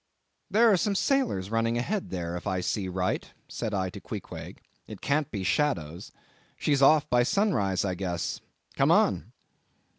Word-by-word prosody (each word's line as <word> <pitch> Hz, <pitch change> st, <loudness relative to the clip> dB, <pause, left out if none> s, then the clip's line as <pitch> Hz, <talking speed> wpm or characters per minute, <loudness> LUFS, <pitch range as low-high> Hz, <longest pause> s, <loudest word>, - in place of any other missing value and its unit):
"There 225 Hz, +3 st, +5 dB
are 195 Hz, -, +4 dB
some 200 Hz, +2 st, 0 dB
sailors 210 Hz, -, 0 dB
running 115 Hz, +1 st, +1 dB
ahead 195 Hz, -, -2 dB
there, 85 Hz, -2 st, -4 dB
if 90 Hz, -, -6 dB
I 95 Hz, -, 0 dB
see 95 Hz, +2 st, -1 dB
right," 90 Hz, 0 st, -2 dB, 0.2 s
said 115 Hz, -3 st, -4 dB
I 95 Hz, -3 st, -1 dB
to -, -, -9 dB
Queequeg, -, -, -7 dB, 0.3 s
"it -, -, -9 dB
can't 145 Hz, 0 st, 0 dB
be 100 Hz, -4 st, -4 dB
shadows; 90 Hz, -, -1 dB, 0.5 s
she's 145 Hz, -2 st, +1 dB
off 150 Hz, +2 st, +5 dB
by 120 Hz, 0 st, +3 dB
sunrise, 120 Hz, -, +1 dB
I 95 Hz, -, 0 dB
guess; 90 Hz, -2 st, -3 dB, 0.3 s
come -, -, +3 dB
on!" -, -, +3 dB
115 Hz, 160 wpm, -28 LUFS, 95-155 Hz, 0.5 s, There